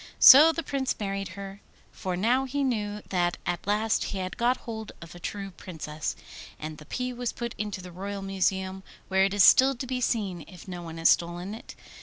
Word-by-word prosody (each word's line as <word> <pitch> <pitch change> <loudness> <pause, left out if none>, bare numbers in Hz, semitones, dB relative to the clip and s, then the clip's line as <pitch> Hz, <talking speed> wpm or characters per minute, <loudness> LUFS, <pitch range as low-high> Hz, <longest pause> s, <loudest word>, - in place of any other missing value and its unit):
So 300 +5 +10
the 330 +1 -4
Prince 270 -3 -2
married 195 -1 -3
her, 195 0 -8 0.3
for 185 -1 -4
now 245 +7 +2
he 280 +2 -2
knew 210 -5 -2
that 175 -2 0
at 175 +2 -3
last 215 +2 +1
he 200 - -4
had 185 -1 -4
got 245 +2 +2
hold 220 -2 -6
of 170 -1 -11
a 175 - -11
true 195 +2 -5
Princess. 155 -4 -6 0.4
And 155 0 -7
the 150 - -14
pea 250 0 -3
was 245 -1 -3
put 235 -1 -5
into 205 -3 -4
the 180 - -9
Royal 195 +2 -5
Museum, 190 0 -1 0.3
where 190 0 +4
it 195 - -1
is 200 - +6
still 265 +1 +7
to 245 - -5
be 255 0 -3
seen 200 -8 -1
if 180 0 -13
no 180 -2 -6
one 165 -1 -8
has 165 - +4
stolen 175 +3 +1
it. 225 - -10
195 Hz, 210 wpm, -27 LUFS, 180-235 Hz, 0.4 s, So